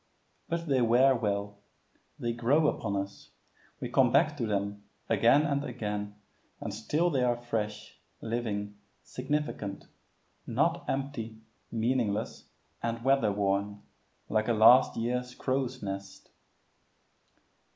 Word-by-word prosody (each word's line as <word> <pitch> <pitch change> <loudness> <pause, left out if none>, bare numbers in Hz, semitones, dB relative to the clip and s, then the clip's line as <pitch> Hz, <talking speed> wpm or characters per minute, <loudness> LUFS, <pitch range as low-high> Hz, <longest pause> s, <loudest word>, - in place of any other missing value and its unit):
But 170 0 -2
they 135 -3 +2
wear 125 +3 +5
well; 100 -3 -2 0.6
they 120 -1 -2
grow 130 +7 +2
upon 100 -7 -1
us; 100 0 -5 0.5
we - - -3
come - - +3
back - - +3
to 115 - -1
them 100 0 -2 0.3
again 115 +7 +5
and 140 -2 0
again, 105 -5 -4 0.4
and 105 - -5
still 150 - 0
they 135 -4 +1
are 120 -1 +2
fresh, 110 -3 -4 0.2
living, 105 -3 -3 0.2
significant 130 -7 -3 0.6
not - - 0
empty, 125 -5 -3 0.3
meaningless, 115 -2 -1 0.4
and 115 0 -3
weather 135 -5 +3
worn, 100 0 -1 0.4
like 110 0 0
a 120 - +3
last 115 +4 +6
year's 125 +2 -2
crow's 130 -2 -2
nest. 100 0 -7
115 Hz, 120 wpm, -30 LUFS, 105-130 Hz, 0.6 s, last